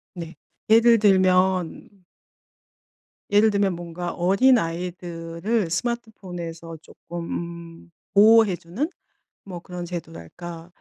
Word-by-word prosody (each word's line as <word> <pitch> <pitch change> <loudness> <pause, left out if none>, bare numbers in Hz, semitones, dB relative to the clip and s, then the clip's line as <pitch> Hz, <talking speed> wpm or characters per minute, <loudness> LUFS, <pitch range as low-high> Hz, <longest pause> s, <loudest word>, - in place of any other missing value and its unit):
네. 170 -2 -8 0.3
예를 230 +1 +6
들면 185 -1 +2 1.3
예를 210 +2 +5
들면 200 -3 +1
뭔가 175 0 -6
어린 195 +9 +3
아이들을 170 +2 -3
스마트폰에서 175 -6 -5
쪼끔 170 +2 -10 0.7
음 - - -27 0.2
보호해 215 -1 +6
주는 185 - -4 0.6
뭐 180 -3 -8
그런 180 0 -7
제도랄까 170 - -8
180 Hz, 210 characters per minute, -23 LUFS, 170-205 Hz, 1.3 s, 예를